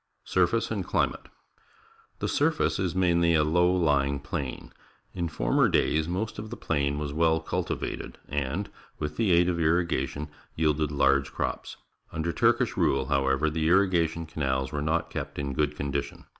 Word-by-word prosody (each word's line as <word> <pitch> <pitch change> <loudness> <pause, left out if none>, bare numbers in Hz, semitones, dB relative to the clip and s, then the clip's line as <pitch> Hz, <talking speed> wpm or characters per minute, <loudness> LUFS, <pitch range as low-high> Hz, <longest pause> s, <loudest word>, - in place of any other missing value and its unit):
Surface - - +1
and - - -1
Climate. - - -1 0.5
— 450 0 -31
The - - 0
surface 150 -7 +1
is 95 -2 -1
mainly 85 -2 +3
a 75 - +4
low 90 +4 +3
ljing 70 -3 +1
plain. 65 -2 -5 0.4
In 85 -2 -2
former - - +2
days 80 +1 +2
most 100 +5 -3
of 110 +1 -6
the - - -7
plain 70 -2 -1
was 75 -1 -3
well 80 +1 +3
cultivated, 80 - -4
and, 75 +8 -2 0.3
with 75 0 -4
the 110 -5 +1
aid 85 0 +5
of 85 -2 0
irrigation, 80 -3 0 0.3
yielded 75 -1 +1
large 70 -1 +2
crops. - - -4 0.3
T'nder 80 +2 -2
Turkish - - +2
rule, 65 0 +1
however, 70 +1 +2
the 80 0 0
irrigation 85 -3 +2
canals 65 -5 -2
were 75 - -2
not 80 +3 -1
kept - - -5
in 70 -1 -3
good 75 +2 0
condition. 70 -1 -4
80 Hz, 160 wpm, -27 LUFS, 70-85 Hz, 0.5 s, aid